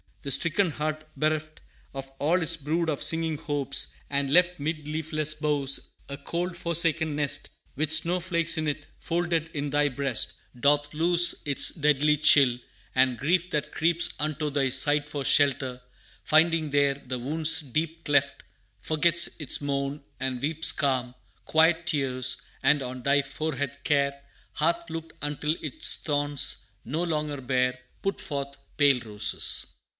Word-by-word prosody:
The 140 - -4
stricken 170 +6 +2
heart 155 +1 -3
bereft 155 0 -2 0.3
Of 135 0 -7
all 170 +5 +2
its 165 +1 +1
brood 160 +2 -2
of 145 - -2
singing 160 -1 0
hopes, 140 -2 -1 0.2
and 140 -1 -1
left 180 0 +4
'Mid 155 0 -4
leafless 155 0 -2
boughs, 145 -3 0 0.3
a 140 - -5
cold, 170 +5 -3
forsaken 165 -2 +1
nest 145 -2 -1 0.3
With 155 +2 -1
snow 170 +3 +5
flakes 170 -2 0
in 155 -1 -1
it, 145 0 -3
folded 165 -1 -1
in 145 -1 -3
Thy 145 +1 +2
breast 135 -3 -2 0.3
Doth 145 +2 +2
lose 175 +2 +6
its 140 -2 +6
deadly 150 -1 +2
chill; 140 -4 +5 0.4
and 130 -1 +2
grief 175 +8 0
that 150 -3 -2
creeps 170 +1 +1
Unto 150 0 -2
Thy 140 -2 0
side 145 +3 +4
for 145 -1 -4
shelter, 135 -2 +2 0.4
finding 160 -1 +2
there 140 -1 +2
The 125 -1 -4
wound's 155 +5 +1
deep 160 +4 -4
cleft, 140 -1 +1 0.4
forgets 165 - +2
its 150 - +1
moan, 140 0 -3 0.2
and 130 -1 -3
weeps 160 +3 +2
Calm, 130 -4 -1 0.3
quiet 165 +2 +3
tears, 130 -4 0 0.3
and 145 0 +3
on 125 0 -7
Thy 140 +1 +3
forehead 140 -1 -4
Care 140 -1 +1 0.3
Hath 170 +2 -1
looked 165 0 -7
until 150 +1 -1
its 310 - -2
thorns, 145 -6 -1 0.2
no 160 +5 -2
longer 150 -4 -2
bare, 125 0 0 0.2
Put 195 0 -2
forth 140 -1 -4 0.2
pale 140 -3 +4
roses. 105 -2 -2
150 Hz, 150 wpm, -26 LUFS, 140-160 Hz, 0.4 s, lose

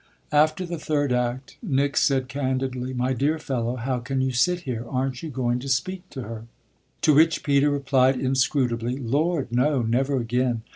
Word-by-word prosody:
After 155 +5 +3
the 170 -2 -5
third 145 -4 0
act 125 +1 -2
Nick 140 - 0
said 135 -2 +2
candidly: 130 -1 -2
"My 130 +1 0
dear 145 +5 +1
fellow, 125 -5 -2
how 125 +1 -2
can 130 +3 -3
you 130 0 +1
sit 175 +8 +1
here? 125 -7 -4
Aren't 130 -1 -2
you 160 - -5
going 125 -3 -1
to 135 +2 -6
speak 185 +8 -2
to 130 - -6
her?" 115 0 -7 0.6
To 155 - +5
which 160 +2 +4
Peter 140 0 +3
replied 135 -2 +2
inscrutably: 130 -2 0
"Lord, 140 +3 0
no, 130 +2 +2
never 135 +5 +1
again. 120 -1 0
130 Hz, 175 wpm, -24 LUFS, 125-145 Hz, 0.6 s, To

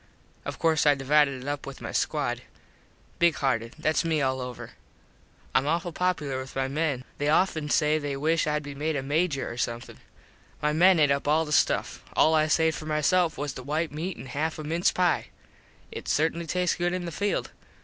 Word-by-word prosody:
Of - - -5
course 160 -2 +2
I 145 - +6
divided 140 -1 +2
it - - -8
up 145 -1 -3
with 140 - -8
my - - -6
squad. - - -1 0.8
Big 170 -2 +4
hearted. 115 -5 -1
Thats 155 0 +1
me 160 -2 +1
all 130 -2 0
over. 125 -1 -7 0.8
Im 130 +2 +3
awful 170 +3 0
popular 155 -7 -1
with 130 +1 -8
my 135 0 0
men. 140 -2 -1 0.2
They 145 +1 +1
offen 155 -2 +2
say 150 +1 +3
they 145 -2 -3
wish 155 +3 +1
Id 150 0 0
be 145 0 -7
made 150 +3 -2
a 135 - -2
Major 145 0 0
or 120 - -8
somethin. 120 -1 -4 0.6
My 150 0 0
men 175 +2 +5
ate 145 -2 +4
up 140 +1 0
all 155 +2 +3
the 150 - -7
stuff. - - +1
All 160 - +4
I 155 0 +3
saved 160 0 +2
for 155 - -8
my 150 0 0
self 175 +1 +2
was 145 -1 -3
the - - -7
white 155 +5 -2
meat 165 +4 -4
an - - -9
half 150 +5 -2
a 155 - -6
mince 165 +4 +1
pie. 180 -3 +1 0.6
It - - -7
certainly 165 +2 0
tastes 180 +1 0
good 175 0 0
in 180 -1 -3
the 170 - -4
field. 200 +5 -1
150 Hz, 210 wpm, -27 LUFS, 140-165 Hz, 0.8 s, I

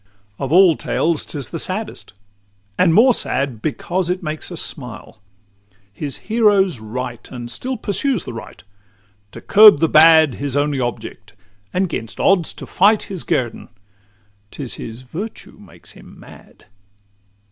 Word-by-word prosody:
IX 100 +1 -38
Of 135 -1 -4
all 180 -1 +6
tales 165 -1 0
't - - -8
is 140 - -6
the 165 - -4
saddest 210 +6 -5 0.6
and 180 - +3
more 240 +9 +5
sad, 130 - -2
Because 175 +5 -2
it 180 +1 -2
makes 155 +2 -5
us 170 - -4
smile: 120 -5 -6 0.7
his 140 +6 -4
hero's 205 - +2
right, 120 +2 -7
And 120 -1 -7
still 255 - -4
pursues 230 - -1
the - - -8
right; 115 - -10 0.7
to - - -11
curb 210 -4 +7
the 165 - +3
bad 160 -2 +6
His 140 -1 -2
only 145 -1 0
object, 110 -3 -6 0.4
and 190 +1 0
'gainst 115 -9 -6
odds 185 -4 +2
to - - -9
fight 205 +3 +3
His 180 - -4
guerdon: 120 -3 -2 0.8
't 145 - -8
is 125 - -4
his 115 +2 -8
virtue 175 - -8
makes - - -13
him - - -16
mad! - - -17
155 Hz, 155 wpm, -19 LUFS, 120-190 Hz, 0.8 s, curb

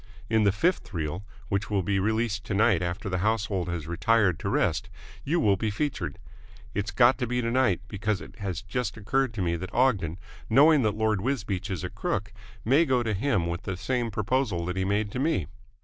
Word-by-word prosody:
In 110 -1 +4
the 100 - +5
fifth 135 - 0
reel, 80 +3 -3 0.3
which 100 +1 -1
will 100 -3 +1
be 95 +2 +1
released 110 +1 0
to 105 - -2
night 105 -4 +4
after 90 +3 -3
the 90 -2 -1
household 100 -3 0
has 85 -3 -3
retired 90 +1 +2
to - - -3
rest, - - 0 0.3
you 170 +5 +1
will 100 -8 +3
be 110 +2 -1
featured. 105 - -3 0.6
It's 105 +2 -2
got 125 +3 +4
to 125 - -1
be 125 +1 -1
tonight, 120 -5 +2
because 105 0 -1
it - - -12
has 95 -4 -4
just 115 +3 -3
occurred 130 +4 0
to 100 - -1
me 85 -1 0
that 90 +2 -6
Ogden, 105 -10 +2 0.3
knowing 145 +5 +6
that 105 -3 0
Lord 110 -3 +1
Wisbeach 105 -6 -2
is 90 -5 -3
a - - -3
crook, 105 +1 -3 0.3
may 135 +8 +5
go 130 -5 +2
to 110 -2 -1
him 100 -4 +1
with 85 +1 -3
the 95 -1 -4
same 120 +3 -1
proposal 110 -4 0
that 90 +1 -3
he 95 0 0
made 100 +1 0
to 125 - -3
me." 150 - +1
105 Hz, 210 wpm, -27 LUFS, 95-120 Hz, 0.6 s, knowing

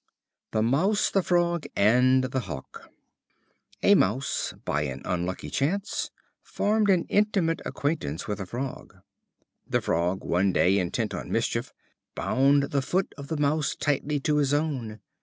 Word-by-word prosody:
The 110 -1 0
Mouse, 180 - +2
the 195 - +3
Frog, 175 -2 +1
and 125 +5 +4
the 130 0 -1
Hawk. 90 - -8 0.9
A - - +6
Mouse, 125 +9 +1
by 75 - 0
an 70 -2 -4
unlucky 90 +1 -3
chance, 190 +9 -1 0.3
formed 210 0 0
an 185 -3 +4
intimate 200 -6 +1
acquaintance 140 - -2
with 105 -1 -3
a 95 - -5
Frog. 130 +5 -6 0.7
The - - +1
Frog 90 +3 -1
one 95 +2 +1
day, 95 +2 +3
intent 90 -2 -2
on - - -5
mischief, - - -1 0.4
bound 140 +1 +2
the 140 - +1
foot 185 +8 -1
of 140 -2 -9
the 160 - -3
Mouse 150 +1 +1
tightly 145 0 0
to 150 +1 +1
his 145 -1 +2
own. 130 -8 -2
140 Hz, 145 wpm, -26 LUFS, 105-160 Hz, 0.9 s, A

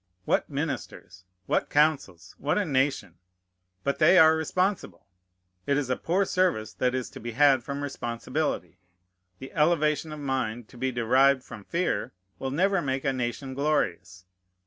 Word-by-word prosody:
What - - +1
ministers! 95 +1 -5 0.2
What - - 0
councils! 145 - +1
What 145 - 0
a 205 - +1
nation! 130 - -1 0.6
But 140 - -1
they 170 +4 +6
are 160 -2 +7
responsible. 160 - -2 0.6
It 140 - +2
is 135 -3 -1
a - - +2
poor 185 +8 0
service 175 - 0
that 125 0 0
is 130 -1 -2
to - - -10
be 120 +1 -6
had 135 -1 +4
from 140 +3 -5
responsibility. 120 - -3 0.6
The 130 - -10
elevation 155 -1 +1
of 155 - -7
mind 125 -5 -2
to - - -15
be 130 +1 0
derived 130 +3 +3
from 105 -5 -11
fear 170 - -1 0.3
will 135 - -3
never 185 +6 +1
make 135 -2 -2
a 135 - +1
nation 130 +2 -3
glorious. 95 - -1
135 Hz, 155 wpm, -27 LUFS, 120-155 Hz, 0.6 s, are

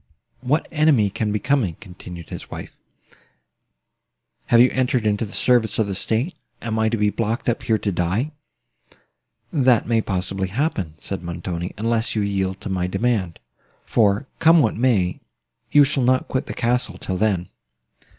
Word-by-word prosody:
"What 140 +6 0
enemy 150 -10 +3
can 105 +1 -2
be 105 - +1
coming?" 125 - 0
continued 90 -4 -10
his - - -8
wife. - - -8 1.7
"Have 120 - +5
you 125 +2 +6
entered 125 -3 0
into 105 +1 +1
the - - -12
service 120 -4 +2
of 110 - +2
the 100 - -3
state? 115 - -1 0.3
Am 110 -1 -3
I 110 0 +2
to 115 - -1
be 105 -1 +2
blocked 115 +2 -2
up 120 0 0
here 115 -2 +1
to 105 -1 -2
die?" 95 - -1 1.2
"That 130 -6 +3
may 115 -1 +2
possibly 95 -1 -2
happen," 100 - -2
said 95 +4 -5
Montoni, 85 0 -5
"unless 115 +2 0
you 105 - +1
yield 95 -1 -1
to - - -6
my 90 -1 -1
demand: 95 -3 -1 0.5
for, 105 +2 +2
come 165 +1 +6
what 110 - +1
may, 105 -7 +1 0.5
you 145 - +7
shall 140 0 +1
not 130 +1 +2
quit 130 - -2
the - - -6
castle 120 -5 0
till 95 0 -4
then." 95 -4 0
110 Hz, 165 wpm, -22 LUFS, 95-125 Hz, 1.7 s, you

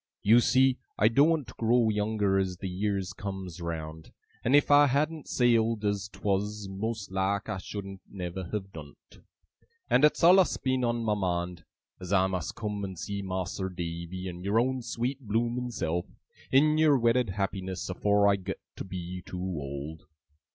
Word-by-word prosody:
You 115 +4 +7
see, 130 +1 +3 0.2
I 105 - +5
doen't 145 0 +2
grow 115 0 +3
younger 105 -2 +1
as 95 -2 -2
the 95 - -5
years 95 0 -2
comes 95 -4 -6
round, 80 -1 -6 0.3
and 125 +4 +3
if 145 0 +4
I 145 0 +7
hadn't 150 +3 0
sailed 115 -3 +2
as 100 -1 -1
'twas, 105 0 -2
most 100 +1 -4
like 95 +1 0
I 105 -3 -3
shouldn't 95 -1 -7
never 90 -1 -5
have 95 +1 -5
done 75 -3 -10 0.2
't. - - -17 0.7
And 130 - +4
it's 150 - +4
allus 185 +2 +6
been 130 -1 0
on 120 -1 0
my 110 -2 +1
mind, 90 -3 -2 0.3
as 90 0 -7
I 95 -2 +4
must 95 -3 -3
come 105 -2 -4
and 95 -2 -5
see 100 +3 -4
Mas'r 95 0 -3
Davy 85 +1 -5
and 90 0 -7
your 100 +3 +2
own 130 +1 0
sweet 120 +3 -3
blooming 120 +2 -1
self, 85 -7 -2 0.4
in 150 +3 +4
your 155 -3 +5
wedded 120 -1 +2
happiness, 95 -1 -3
afore 100 +2 +2
I 100 0 +4
got 95 - -5 0.2
to - - -4
be 90 -1 -6
too 90 - -8
old. 75 -3 -5
100 Hz, 170 wpm, -29 LUFS, 95-120 Hz, 0.7 s, You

